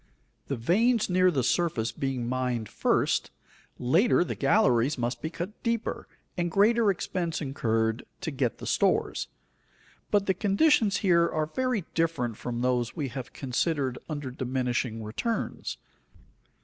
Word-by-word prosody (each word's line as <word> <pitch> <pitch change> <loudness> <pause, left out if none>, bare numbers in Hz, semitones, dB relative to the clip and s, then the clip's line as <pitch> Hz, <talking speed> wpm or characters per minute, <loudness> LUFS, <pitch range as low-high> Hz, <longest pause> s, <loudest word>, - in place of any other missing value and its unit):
The 140 - -1
veins 215 - +2
near 185 0 +5
the 140 -7 0
surface 120 -8 +1
being 130 -2 -3
mined 125 -3 -1
first, - - +1 0.5
later 175 - +3
the - - -3
galleries 135 - +3
must 120 0 -2
be 160 - -2
cut 175 +5 -6
deeper 230 -1 -2 0.3
and 175 -1 -1
greater 215 +4 +4
expense 175 -3 -2
incurred 115 -5 0 0.2
to 160 - -3
get 130 -5 -1
the - - -8
stores. - - +1 0.8
But 205 -1 +2
the 190 - +2
conditions 205 - +3
here 170 -2 +4
are 155 -1 0
very 245 +3 -1
different 160 -9 0
from 120 +1 -4
those 125 -2 0
we 145 -6 -2
have 130 0 -7
considered 135 0 -1
under 145 -4 -4
diminishing 125 -3 -2
returns. 170 - -3
145 Hz, 135 wpm, -28 LUFS, 125-185 Hz, 0.8 s, near